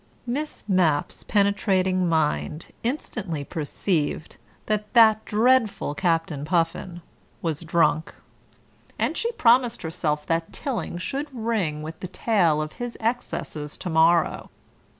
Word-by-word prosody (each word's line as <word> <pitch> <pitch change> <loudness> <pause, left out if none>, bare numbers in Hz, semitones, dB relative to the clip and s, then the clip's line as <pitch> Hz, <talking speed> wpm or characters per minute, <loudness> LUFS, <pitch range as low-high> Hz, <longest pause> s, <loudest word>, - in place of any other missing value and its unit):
Miss 285 +5 -4
Mapp's 170 -7 +1
penetrating 190 -3 +2
mind 155 0 0
instantly 220 - -3
perceived 155 +1 -2 0.3
that 210 -1 -2
that 220 -2 +6
dreadful 225 - +2
Captain 165 -4 0
Puffin 170 +2 -1 0.4
was 160 -3 -1
drunk, 165 -1 +1 0.8
and - - 0
she 465 - -1
promised 245 - +3
herself 160 -3 -2
that 165 0 -1
Tilling 250 -9 -3
should 270 +11 -3
ring 220 - -1
with 160 +1 -7
the 185 - -5
tale 175 -6 +2
of 155 - -7
his 240 -1 -4
excesses 220 -10 -3
to 180 - -5
morrow. 165 +1 +3
180 Hz, 115 wpm, -25 LUFS, 160-220 Hz, 0.8 s, that